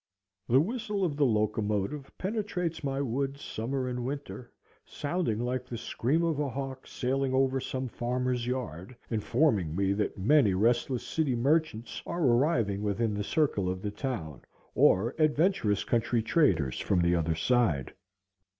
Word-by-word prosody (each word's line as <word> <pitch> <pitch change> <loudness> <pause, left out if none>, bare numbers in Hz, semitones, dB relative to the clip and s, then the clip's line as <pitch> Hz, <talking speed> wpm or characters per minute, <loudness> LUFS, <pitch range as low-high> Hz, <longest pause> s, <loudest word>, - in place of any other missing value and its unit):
The 125 +3 +5
whistle 210 - -1
of 155 -5 -1
the 145 -2 +3
locomotive 105 +4 -1
penetrates 185 -5 -2
my 135 0 -1
woods 140 +2 -2
summer 130 +4 -3
and 125 -1 -3
winter, 135 -2 -6 0.3
sounding 145 -7 -2
like 125 +1 -1
the 120 - -5
scream 130 +7 0
of 165 -3 0
a 145 -2 0
hawk 135 0 -6
sailing 130 +1 -1
over 135 0 +2
some 130 0 -3
farmer's 125 0 -2
yard, 125 -5 -4 0.2
informing 110 - +1
me 100 +1 +1
that 105 +1 -2
many 105 0 +4
restless 120 +4 +1
city 150 -6 0
merchants 120 -4 0
are 170 0 -2
arriving 120 -6 +2
within 105 +2 0
the 105 0 -2
circle 105 - +1
of 95 0 -4
the 105 - -2
town, 105 - -4 0.3
or 110 +7 +4
adventurous 155 - +2
country 115 -1 +1
traders 90 - +2
from 90 -3 +1
the 85 0 +3
other 80 -1 0
side. 95 - +1
125 Hz, 150 wpm, -29 LUFS, 105-140 Hz, 0.3 s, The